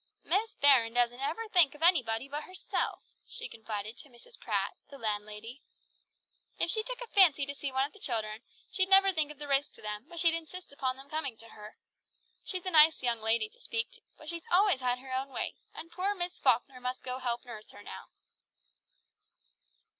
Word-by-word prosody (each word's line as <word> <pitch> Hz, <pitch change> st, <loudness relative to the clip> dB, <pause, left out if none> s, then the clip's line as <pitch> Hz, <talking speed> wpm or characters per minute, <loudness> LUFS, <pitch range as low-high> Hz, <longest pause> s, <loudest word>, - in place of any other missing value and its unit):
"Miss 415 Hz, +5 st, 0 dB
Baron 250 Hz, -5 st, +5 dB
doesn't 245 Hz, 0 st, +2 dB
ever 330 Hz, +12 st, -3 dB
think 350 Hz, -9 st, +5 dB
of 300 Hz, -, -8 dB
anybody 260 Hz, -8 st, +3 dB
but 295 Hz, +2 st, -5 dB
herself," 370 Hz, +1 st, -3 dB, 0.3 s
she -, -, -6 dB
confided 220 Hz, 0 st, -6 dB
to 290 Hz, -, -13 dB
Mrs. 250 Hz, -, -15 dB
Pratt, -, -, -1 dB, 0.2 s
the 280 Hz, -, -11 dB
landlady. 215 Hz, +2 st, -4 dB, 1.0 s
"If 335 Hz, -, +1 dB
she 435 Hz, -, +3 dB
took -, -, -5 dB
a -, -, -6 dB
fancy 350 Hz, -10 st, +5 dB
to 280 Hz, -, -5 dB
see 280 Hz, -1 st, -5 dB
one 265 Hz, +1 st, +1 dB
of 285 Hz, -, -10 dB
the 415 Hz, -, -17 dB
children, 220 Hz, -, -2 dB, 0.3 s
she'd 375 Hz, -1 st, +2 dB
never 390 Hz, 0 st, +7 dB
think 310 Hz, -3 st, 0 dB
of 300 Hz, -, -10 dB
the 295 Hz, +1 st, -6 dB
risk 280 Hz, +1 st, +1 dB
to -, -, -14 dB
them, 210 Hz, +4 st, -5 dB
but 340 Hz, -1 st, -7 dB
she'd 335 Hz, -1 st, +5 dB
insist 330 Hz, 0 st, -6 dB
upon 260 Hz, -2 st, -2 dB
them 270 Hz, +1 st, -12 dB
coming 290 Hz, -6 st, -4 dB
to 230 Hz, 0 st, -9 dB
her. 210 Hz, 0 st, -12 dB, 0.7 s
She's 370 Hz, -2 st, -4 dB
a 370 Hz, -, 0 dB
nice 310 Hz, -2 st, +6 dB
young 235 Hz, -2 st, 0 dB
lady 225 Hz, -, +1 dB
to 485 Hz, +3 st, -17 dB
speak 455 Hz, 0 st, -2 dB
to, -, -, -13 dB, 0.2 s
but 310 Hz, -, -14 dB
she's 335 Hz, +1 st, -5 dB
always 375 Hz, -4 st, +4 dB
had 250 Hz, -1 st, 0 dB
her 260 Hz, +1 st, -9 dB
own 265 Hz, +1 st, -2 dB
way, -, -, -3 dB, 0.2 s
and 330 Hz, -, -9 dB
poor 380 Hz, +4 st, -1 dB
Miss 355 Hz, -1 st, -3 dB
Falkner 255 Hz, 0 st, +1 dB
must 250 Hz, +1 st, -4 dB
go 255 Hz, 0 st, -4 dB
to -, -, -11 dB
help 240 Hz, 0 st, -1 dB
nurse 215 Hz, -3 st, -10 dB
her 205 Hz, -, -13 dB
now!" 95 Hz, -, -9 dB
275 Hz, 205 wpm, -30 LUFS, 240-345 Hz, 1.0 s, never